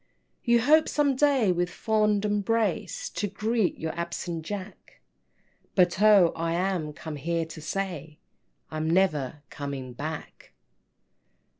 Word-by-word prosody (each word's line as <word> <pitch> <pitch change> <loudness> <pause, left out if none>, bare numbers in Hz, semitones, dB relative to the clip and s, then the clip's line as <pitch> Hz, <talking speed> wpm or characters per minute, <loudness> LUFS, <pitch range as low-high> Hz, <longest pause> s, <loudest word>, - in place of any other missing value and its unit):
IV. - - -34
"You 235 0 +5
hope 310 +6 +5
some 285 -2 +2
day 265 -7 +3
with 175 0 0
fond 210 +1 +1
embrace 225 - 0
To 205 - -2
greet 215 +1 0
your 160 0 -3
absent 170 -1 -4
Jack, 200 +3 -8 0.8
But 180 0 +3
oh, 205 -5 +6
I 165 0 -1
am 175 -3 -1
come 150 0 -7
here 165 +3 -1
to 160 0 -10
say 160 -3 -4 0.5
I'm 155 0 -2
never 155 -6 +1
coming 140 -3 -5
back!" 155 +5 -7
180 Hz, 130 wpm, -27 LUFS, 160-210 Hz, 0.8 s, oh